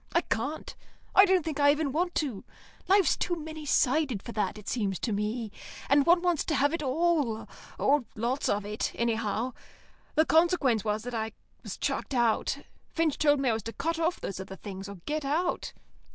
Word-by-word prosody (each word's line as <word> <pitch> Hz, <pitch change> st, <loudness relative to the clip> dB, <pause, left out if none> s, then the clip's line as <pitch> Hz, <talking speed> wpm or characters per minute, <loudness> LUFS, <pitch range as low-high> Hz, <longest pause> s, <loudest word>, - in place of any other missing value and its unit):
I 340 Hz, -, +4 dB
can't. 280 Hz, +5 st, -3 dB, 0.4 s
I 390 Hz, -, +8 dB
don't 370 Hz, -4 st, +2 dB
think 305 Hz, -3 st, -3 dB
I 285 Hz, 0 st, +6 dB
even 290 Hz, -1 st, +2 dB
want 350 Hz, +5 st, -1 dB
to. 260 Hz, -11 st, -2 dB, 0.4 s
Life's 390 Hz, 0 st, +4 dB
too 350 Hz, -, -1 dB
many 315 Hz, -1 st, -7 dB
sided 265 Hz, -6 st, +2 dB
for -, -, -7 dB
that, 210 Hz, -2 st, -1 dB
it 210 Hz, -, -12 dB
seems 200 Hz, -6 st, -1 dB
to 230 Hz, -, -2 dB
me, 210 Hz, +2 st, -2 dB, 0.4 s
and 280 Hz, +1 st, +4 dB
one 345 Hz, +1 st, +5 dB
wants 350 Hz, -4 st, +2 dB
to 310 Hz, -, 0 dB
have 285 Hz, +2 st, +2 dB
it 335 Hz, -, -1 dB
all 290 Hz, -5 st, +1 dB, 0.3 s
or 280 Hz, -2 st, +2 dB
lots 240 Hz, +5 st, -1 dB
of 205 Hz, 0 st, 0 dB
it, 210 Hz, +1 st, -2 dB
anyhow. 230 Hz, +1 st, -1 dB, 0.6 s
The 315 Hz, -, +5 dB
consequence 320 Hz, -, +3 dB
was 215 Hz, 0 st, -1 dB
that 245 Hz, +1 st, -6 dB
I 220 Hz, -1 st, -2 dB, 0.3 s
was -, -, -7 dB
chucked 275 Hz, -, -2 dB
out. 235 Hz, -3 st, +2 dB, 0.3 s
Finch 325 Hz, -3 st, 0 dB
told 290 Hz, -2 st, +4 dB
me 265 Hz, -, +2 dB
I -, -, +2 dB
was 220 Hz, -, -2 dB
to 230 Hz, +2 st, -6 dB
cut 330 Hz, +9 st, -2 dB
off 335 Hz, +2 st, 0 dB
those 195 Hz, -, -5 dB
other 190 Hz, 0 st, -7 dB
things, 195 Hz, 0 st, -8 dB
or 200 Hz, -, -7 dB
get 305 Hz, 0 st, -2 dB
out. 320 Hz, +6 st, -1 dB
275 Hz, 195 wpm, -29 LUFS, 220-320 Hz, 0.6 s, I